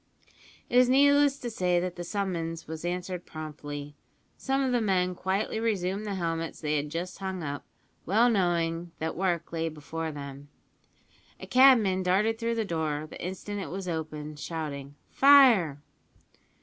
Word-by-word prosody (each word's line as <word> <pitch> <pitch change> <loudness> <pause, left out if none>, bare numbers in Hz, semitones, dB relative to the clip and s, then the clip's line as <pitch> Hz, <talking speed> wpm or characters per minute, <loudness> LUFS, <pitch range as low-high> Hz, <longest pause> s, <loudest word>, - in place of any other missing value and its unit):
It 245 - +4
is 250 0 +5
needless 285 +1 +5
to 240 -3 -5
say 180 -4 +1
that 180 0 -3
the 175 - -5
summons 170 -4 -3
was 160 +1 -6
answered 180 0 -3
promptly. 145 -2 -7 0.4
Some 270 +1 0
of 260 - 0
the 245 -1 +2
men 185 -3 +1
quietly 190 +4 -1
resumed 205 -2 -1
the 200 - -2
helmets 165 -2 -3
they 150 -1 -1
had 145 +1 -3
just 170 +5 -5
hung 190 -3 -4
up, 145 -1 -4 0.4
well 220 +7 +3
knowing 170 -5 0
that 160 0 -3
work 175 -2 -1
lay 165 0 -1
before 160 +1 -5
them. 140 -1 -9 0.9
A - - -8
cabman 240 -8 +5
darted 205 +5 +1
through 230 0 -1
the 225 -1 -1
door 155 -4 -2
the - - -10
instant 195 +3 -5
it - - -6
was 190 0 -5
opened, 155 -2 -5
shouting 145 -4 -5 0.2
"Fire!" 235 - +6
180 Hz, 160 wpm, -28 LUFS, 160-210 Hz, 0.9 s, Fire